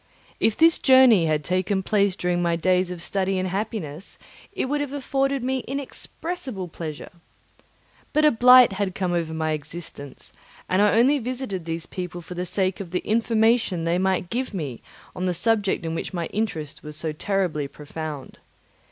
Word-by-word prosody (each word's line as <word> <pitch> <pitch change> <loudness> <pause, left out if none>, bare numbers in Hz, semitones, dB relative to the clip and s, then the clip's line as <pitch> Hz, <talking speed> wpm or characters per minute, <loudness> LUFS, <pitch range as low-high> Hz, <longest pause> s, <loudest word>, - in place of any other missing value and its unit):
If 220 - +2
this 330 0 +5
journey 255 - +6
had 155 -1 0
taken 185 +4 0
place 200 -2 +2
during 180 -1 0
my 170 -1 +1
days 180 +2 +2
of 175 -2 -6
study 195 0 -1
and 185 0 -1
happiness, 190 -4 -4 0.3
it - - -2
would 290 +2 -1
have 285 -1 -4
afforded 275 -1 -1
me 260 +1 0
inexpressible 275 - -5
pleasure. 155 -2 -7 1.0
But 305 0 +3
a 300 - +6
blight 250 -1 +7
had 195 -1 -2
come 185 -2 -1
over 165 -2 -1
my 160 0 -1
existence, 155 -2 -7 0.3
and 185 +2 +2
I 210 +1 +4
only 270 +5 +4
visited 245 -8 -4
these 165 0 -3
people 180 -1 -6
for 170 +2 -9
the 180 +1 -4
sake 185 +1 0
of 195 -4 -6
the 180 +1 -2
information 225 -4 +2
they 170 +2 +1
might 190 -1 0
give 250 -3 -2
me 145 -9 -4 0.3
on 180 - -3
the 180 -1 0
subject 205 -3 +1
in 165 - -2
which 165 - -4
my 170 -1 -2
interest 170 -9 -3
was 150 0 -7
so 160 0 -2
terribly 165 -3 -1
profound. 150 0 -8
185 Hz, 175 wpm, -24 LUFS, 165-230 Hz, 1.0 s, blight